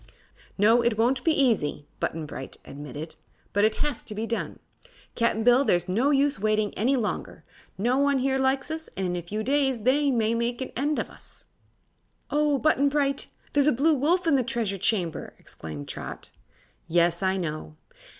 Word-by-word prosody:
"No; 225 Hz, +4 st, +5 dB
it 235 Hz, -2 st, +1 dB
won't 250 Hz, +4 st, +2 dB
be 325 Hz, -, +3 dB
easy," 225 Hz, -, +1 dB
Button 160 Hz, -1 st, -2 dB
Bright 135 Hz, -2 st, -7 dB
admitted. 145 Hz, +2 st, -8 dB, 0.4 s
"But 205 Hz, +1 st, +4 dB
it 215 Hz, -, +2 dB
has 290 Hz, -5 st, -2 dB
to 210 Hz, -, -6 dB
be 220 Hz, +2 st, -2 dB
done, 230 Hz, 0 st, -3 dB, 0.6 s
Cap'n 230 Hz, -1 st, +1 dB
Bill, 245 Hz, +2 st, +6 dB
and 280 Hz, -, +1 dB
there's 175 Hz, 0 st, +2 dB
no 230 Hz, +10 st, +2 dB
use 285 Hz, 0 st, +2 dB
waiting 215 Hz, 0 st, +1 dB
any 255 Hz, +6 st, +1 dB
longer. 230 Hz, -5 st, -3 dB, 0.3 s
No 245 Hz, +7 st, +1 dB
one 280 Hz, -1 st, +3 dB
here 265 Hz, +1 st, +1 dB
likes 265 Hz, +2 st, 0 dB
us, 320 Hz, 0 st, -5 dB
and 190 Hz, -, -1 dB
in 180 Hz, 0 st, -1 dB
a 175 Hz, -, -2 dB
few 210 Hz, +6 st, -4 dB
days 270 Hz, -1 st, +1 dB
they 280 Hz, +5 st, +3 dB
may 230 Hz, -3 st, +1 dB
make 235 Hz, +1 st, -1 dB
an 260 Hz, -, -4 dB
end 290 Hz, +4 st, 0 dB
of -, -, -3 dB
us." -, -, -11 dB, 0.9 s
"Oh, 295 Hz, -1 st, +2 dB
Button 285 Hz, -1 st, +3 dB
Bright! 275 Hz, -1 st, 0 dB, 0.3 s
There's 285 Hz, 0 st, +3 dB
a -, -, +6 dB
Blue 290 Hz, +6 st, +3 dB
Wolf 330 Hz, +7 st, +2 dB
in 325 Hz, -, +3 dB
the 255 Hz, -, +1 dB
Treasure 225 Hz, -5 st, -2 dB
Chamber!" 180 Hz, -5 st, -1 dB
exclaimed 75 Hz, -3 st, -8 dB
Trot. -, -, -7 dB, 0.6 s
"Yes; 170 Hz, +1 st, +2 dB
I 190 Hz, 0 st, +1 dB
know." 155 Hz, -, -4 dB
235 Hz, 185 wpm, -26 LUFS, 195-275 Hz, 0.9 s, Bill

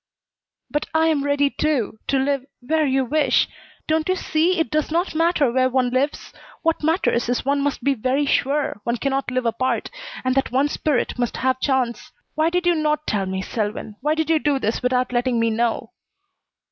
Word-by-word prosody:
"But 295 Hz, -, -1 dB
I 320 Hz, 0 st, +4 dB
am 295 Hz, -3 st, +1 dB
ready, 285 Hz, 0 st, +2 dB
too, 265 Hz, -8 st, -1 dB
to 275 Hz, -, +2 dB
live 275 Hz, 0 st, 0 dB, 0.2 s
where 310 Hz, +4 st, +1 dB
you 265 Hz, 0 st, +1 dB
wish. 280 Hz, -1 st, +2 dB, 0.4 s
Don't 315 Hz, +2 st, +1 dB
you 370 Hz, -, +3 dB
see 340 Hz, +1 st, +1 dB
it 325 Hz, -, 0 dB
does 310 Hz, -1 st, 0 dB
not 340 Hz, +4 st, 0 dB
matter 325 Hz, -5 st, +2 dB
where 255 Hz, +1 st, +2 dB
one 255 Hz, -1 st, +1 dB
lives? 270 Hz, +4 st, -1 dB, 0.3 s
What 330 Hz, -1 st, +1 dB
matters 310 Hz, -7 st, +1 dB
is 245 Hz, -, -1 dB
one 280 Hz, +1 st, +1 dB
must 280 Hz, -3 st, -2 dB
be 280 Hz, -, +3 dB
very 260 Hz, +4 st, 0 dB
sure 275 Hz, -5 st, 0 dB
one 235 Hz, +2 st, -1 dB
cannot 275 Hz, +2 st, -1 dB
live 255 Hz, 0 st, -1 dB
apart, 235 Hz, +3 st, -1 dB, 0.3 s
and 255 Hz, 0 st, +1 dB
that 270 Hz, 0 st, 0 dB
one's 275 Hz, +3 st, +2 dB
spirit 275 Hz, -4 st, -1 dB
must 240 Hz, -1 st, -1 dB
have 260 Hz, 0 st, 0 dB
chance. 260 Hz, -4 st, -1 dB, 0.2 s
Why 310 Hz, +2 st, +2 dB
did 355 Hz, +1 st, -1 dB
you 350 Hz, -, +4 dB
not 305 Hz, -1 st, 0 dB
tell 195 Hz, -2 st, -1 dB
me, 190 Hz, 0 st, -3 dB
Selwyn? 210 Hz, 0 st, -4 dB
Why 300 Hz, +3 st, +1 dB
did 320 Hz, 0 st, 0 dB
you 320 Hz, -, +4 dB
do 290 Hz, -2 st, +1 dB
this 225 Hz, -3 st, -1 dB
without 250 Hz, 0 st, +1 dB
letting 240 Hz, -1 st, +1 dB
me 230 Hz, 0 st, +2 dB
know?" 230 Hz, +1 st, -1 dB
275 Hz, 195 wpm, -22 LUFS, 245-310 Hz, 0.4 s, I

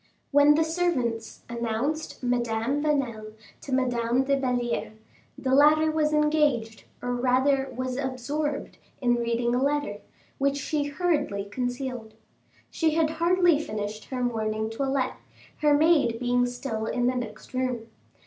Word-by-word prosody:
When 290 Hz, +1 st, +6 dB
the 320 Hz, -, +3 dB
servants 315 Hz, -10 st, -1 dB
announced 235 Hz, +7 st, -3 dB
Madame 240 Hz, +2 st, 0 dB
Vanel 245 Hz, -8 st, -1 dB, 0.3 s
to 275 Hz, -, -8 dB
Madame 250 Hz, -1 st, +1 dB
de 275 Hz, +1 st, +2 dB
Belliere, 245 Hz, -4 st, -1 dB, 0.4 s
the 260 Hz, 0 st, -1 dB
latter 305 Hz, +3 st, +5 dB
was 310 Hz, -1 st, +1 dB
engaged, 300 Hz, -7 st, +1 dB, 0.2 s
or 245 Hz, 0 st, -1 dB
rather 260 Hz, +2 st, +2 dB
was 255 Hz, 0 st, -2 dB
absorbed, 280 Hz, +3 st, -3 dB, 0.2 s
in 240 Hz, -2 st, +2 dB
reading 235 Hz, 0 st, 0 dB
a 250 Hz, -, +1 dB
letter, 280 Hz, -7 st, 0 dB, 0.4 s
which 280 Hz, 0 st, +1 dB
she 290 Hz, +1 st, -1 dB
hurriedly 290 Hz, -, -1 dB
concealed. 245 Hz, 0 st, -4 dB, 0.6 s
She 320 Hz, -2 st, +1 dB
had 320 Hz, -1 st, +2 dB
hardly 340 Hz, 0 st, +3 dB
finished 215 Hz, -1 st, -5 dB
her 255 Hz, -2 st, -3 dB
morning 220 Hz, -2 st, -1 dB
toilette, 265 Hz, +2 st, -1 dB, 0.4 s
her 295 Hz, -2 st, +4 dB
maid 295 Hz, -7 st, +3 dB
being 245 Hz, 0 st, +2 dB
still 245 Hz, -3 st, -4 dB
in 245 Hz, -1 st, 0 dB
the 250 Hz, -, +2 dB
next 245 Hz, 0 st, -6 dB
room. 255 Hz, -3 st, -1 dB
255 Hz, 135 wpm, -26 LUFS, 235-295 Hz, 0.6 s, When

